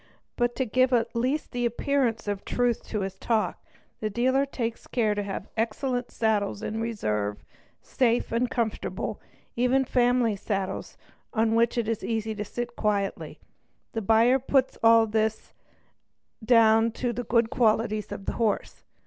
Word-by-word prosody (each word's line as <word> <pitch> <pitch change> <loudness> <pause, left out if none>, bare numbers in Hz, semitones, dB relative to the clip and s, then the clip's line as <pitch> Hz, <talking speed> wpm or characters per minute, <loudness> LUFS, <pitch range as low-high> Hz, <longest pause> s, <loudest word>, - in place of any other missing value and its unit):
But, 240 -1 0
to 260 - 0
give 255 +3 +2
at 235 0 +1
least 260 +6 -1
the 245 0 -2
appearance 240 -1 0
of 205 -1 -2
truth 245 -2 0
to 215 - -2
his 190 0 -5
talk, 225 -2 -1 0.4
the 215 - -2
dealer 260 +5 +1
takes 230 -4 -4
care 220 -4 +1
to 205 - -2
have 200 0 -5
excellent 245 +3 -1
saddles 210 -2 0
in 220 +1 -3
reserve, 105 - -2 0.4
safe 240 -2 +1
and 235 +2 +1
comfortable, 230 -4 -3 0.3
even 250 +2 +2
family 245 -3 +2
saddles 195 -1 -4 0.4
on 225 0 +2
which 230 +1 +2
it 235 -2 0
is 225 -2 -2
easy 220 -1 -2
to 210 -1 -4
sit 240 +3 -5
quietly. 205 -2 -1 0.6
The 225 - -2
buyer 225 +5 +4
puts 265 0 +1
all 230 -1 +6
this 220 0 -1 0.9
down 225 -1 +5
to 245 0 -2
the 245 - -3
good 230 0 +2
qualities 215 -2 +1
of 195 - -6
the - - -2
horse. 220 -4 -1
230 Hz, 155 wpm, -26 LUFS, 215-245 Hz, 0.9 s, all